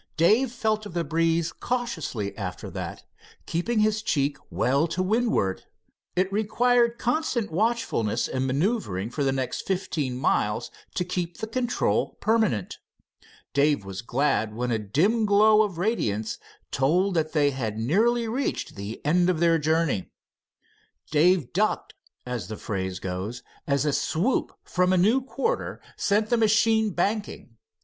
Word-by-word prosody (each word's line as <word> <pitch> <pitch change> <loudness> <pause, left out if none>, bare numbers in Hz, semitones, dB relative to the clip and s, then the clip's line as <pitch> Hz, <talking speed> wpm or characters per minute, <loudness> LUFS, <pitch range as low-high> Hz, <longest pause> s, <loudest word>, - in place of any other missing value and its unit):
Dave 220 +10 +4
felt 215 -3 -1
of 180 - -11
the 170 - +1
breeze 165 +1 +1
cautiously 165 - -3
after - - -6
that, - - -6 0.4
keeping 215 +7 0
his 215 0 +2
cheek 145 -9 0
well 140 +6 +1
to 175 +3 -1
windward. 215 - 0 0.5
It 185 +2 +1
required 235 +3 +2
constant 245 - -1
watchfulness 210 - 0
and 130 0 -1
maneuvering 135 - -1
for 140 - -2
the 135 - +2
next 130 -1 -3
fifteen 165 -9 -1
miles 115 -2 0 0.2
to 180 - 0
keep 175 -1 -3
the - - -3
control 245 +2 0
permanent. 215 - +1 0.7
Dave 140 -6 +2
was 95 +1 -6
glad 120 -4 0
when 125 +1 -2
a 115 - +1
dim 185 - +1
glow 210 +1 +6
of 200 -5 -1
radiance 110 - -1 0.3
told 175 +9 +2
that 160 -2 0
they 145 -2 +3
had 115 -5 -3
nearly 225 - +2
reached 255 +5 -2
the 100 +6 -7
end 175 +4 +3
of 175 -3 +1
their 165 -1 +4
journey. 155 - 0 1.0
Dave 160 -2 +3
"ducked," 210 +4 0 0.3
as 125 -3 -4
the 110 - -6
phrase 95 -2 -3
goes, 95 +6 -5 0.2
as 140 0 +1
a 150 - +1
swoop 185 - 0
from 180 0 +1
a - - +3
new 220 +9 +4
quarter 460 - -2 0.2
sent 210 +2 +1
the 240 - +4
machine 220 0 +3
banking. 200 - -2
170 Hz, 145 wpm, -26 LUFS, 130-220 Hz, 1.0 s, glow